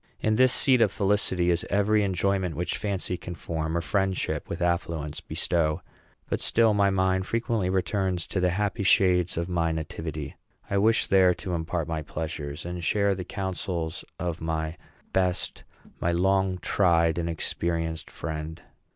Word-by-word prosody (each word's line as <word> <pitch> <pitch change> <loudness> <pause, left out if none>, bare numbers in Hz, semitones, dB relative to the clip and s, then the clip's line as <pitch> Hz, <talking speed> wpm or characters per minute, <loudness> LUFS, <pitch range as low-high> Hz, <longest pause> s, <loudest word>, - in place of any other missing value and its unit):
In 110 0 +1
this 130 +2 +5
seat 130 -2 +5
of 105 -4 +4
felicity 95 -4 +2
is 85 0 +1
every 105 +2 +3
enjoyment 95 -2 0
which 90 +4 -1
fancy 95 -3 -2
can 85 0 -7
form, 80 0 -3
or - - 0
friendship, 95 +1 -1
with 85 - -4
affluence, 85 -4 -1
bestow; 80 -3 0 0.4
but - - -2
still 115 -1 +4
my 100 -1 +3
mind 95 0 +1
frequently 115 -4 0
returns 95 -1 0
to 95 - -2
the 90 0 +3
happy 105 +4 -1
shades 90 -3 +3
of 85 0 -1
my 85 -2 0
nativity. 80 -2 -5 0.4
I 100 - +2
wish 110 +3 +3
there 95 -2 +4
to 95 -3 -5
impart 80 -1 -2
my 80 -1 -2
pleasures, 75 -1 -5
and 90 0 -5
share 100 +3 +2
the 95 -1 -4
counsels 90 -3 -3
of 85 -2 -3
my 80 0 -2 0.4
best, 90 -1 0 0.4
my 85 - +1
long 95 +1 +2
tried, 85 -3 +3
and 85 0 -1
experienced 80 0 -2
friend. 80 +1 -5
90 Hz, 160 wpm, -27 LUFS, 80-95 Hz, 0.4 s, this